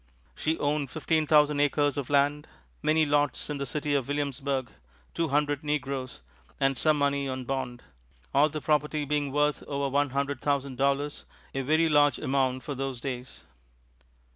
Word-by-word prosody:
She 160 +1 -1
owned 145 -1 0
fifteen 155 +2 0
thousand 150 -1 +4
acres 145 -1 +2
of 140 -3 -4
land, 145 +1 +2 0.3
many 155 0 +3
lots 145 0 0
in 145 - -3
the 140 - -3
city 145 +3 -2
of 140 -4 0
Williamsburg, 140 -3 -2 0.4
two 165 -1 0
hundred 145 0 0
negroes, 135 - -3 0.4
and 135 0 +2
some 155 +3 +2
money 140 -1 +1
on 130 0 -4
bond; 125 -1 -4 0.5
all 150 +2 +5
the 155 0 -5
property 150 0 +1
being 145 -1 -1
worth 150 +1 +1
over 140 -1 -1
one 145 +1 +1
hundred 140 0 -2
thousand 140 -2 -1
dollars 140 +1 0 0.3
a 135 - -1
very 155 +5 +3
large 145 -3 +4
amount 130 -1 0
for 145 - -4
those 135 -2 -4
days. 125 -1 -6
145 Hz, 165 wpm, -28 LUFS, 135-150 Hz, 0.5 s, all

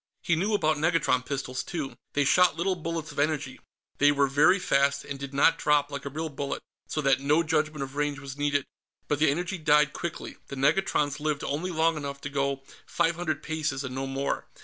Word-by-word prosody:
He 170 - +2
knew 200 +6 +1
about 155 -6 +2
negatron 155 -5 +2
pistols, 130 -2 -3
too. 155 -6 -4 0.2
They 145 - +2
shot 180 +6 +4
little 185 +3 +1
bullets 165 -2 -4
of 145 - -6
energy; 145 -3 -1 0.4
they 145 +1 +6
were 140 -1 +3
very 145 +7 +4
fast, 140 -6 +1
and 140 -1 -6
did 140 -1 -6
not 140 +4 +3
drop, 145 -1 +2
like 140 -1 -6
a - - -3
real 160 +3 -4
bullet, 140 -1 -4 0.2
so 155 - -2
that 135 -2 +3
no 150 +4 +3
judgment 155 -2 0
of 135 +1 -8
range 145 -1 -1
was 135 -1 -8
needed. 145 -1 0 0.4
But 145 - 0
the 155 -1 +4
energy 175 +5 -2
died 150 -1 +4
quickly; 170 - -5
the 140 - -7
negatrons 150 0 +1
lived 150 -1 -1
only 155 +6 -2
long 165 -1 +1
enough 140 -1 -5
to 145 - -5
go 140 -1 -1 0.2
five 170 0 +1
hundred 170 -2 -3
paces 155 -3 -2
and 130 -2 -5
no 135 +1 -3
more. 135 +1 -2
145 Hz, 210 wpm, -27 LUFS, 140-160 Hz, 0.4 s, they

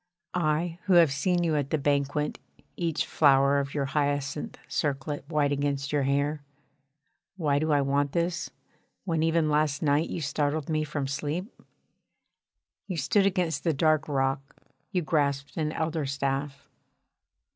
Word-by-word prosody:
I 165 0 0
who 190 - +3
have 170 -5 +6
seen 175 +5 +1
you 160 -2 +1
at 145 -2 -1
the 155 - +1
banquet 145 +1 0 0.4
each 165 -3 -1
flower 140 -1 +4
of 140 +1 -4
your 140 -2 0
hyacinth 145 0 -1
circlet 145 0 -2
white 150 -3 +1
against 140 -1 -1
your 145 - +2
hair. 140 +2 0 1.0
Why 145 -5 +1
do 155 +1 0
I 145 -1 +4
want 140 +1 0
this, 170 +1 -1 0.6
when 165 -4 0
even 165 0 +2
last 150 -1 +1
night 145 +2 +2
you - - -3
startled 145 0 -1
me 155 -1 +1
from 145 -2 -3
sleep? 150 - -3 1.3
You 185 -4 -3
stood 195 +7 +3
against 175 -6 0
the 165 - +2
dark 155 +1 +2
rock, 135 -1 -1 0.4
you 180 -2 0
grasped 140 -3 0
an 155 -1 -1
elder 160 -2 -2
staff. 140 +1 -3
150 Hz, 145 wpm, -27 LUFS, 140-160 Hz, 1.3 s, have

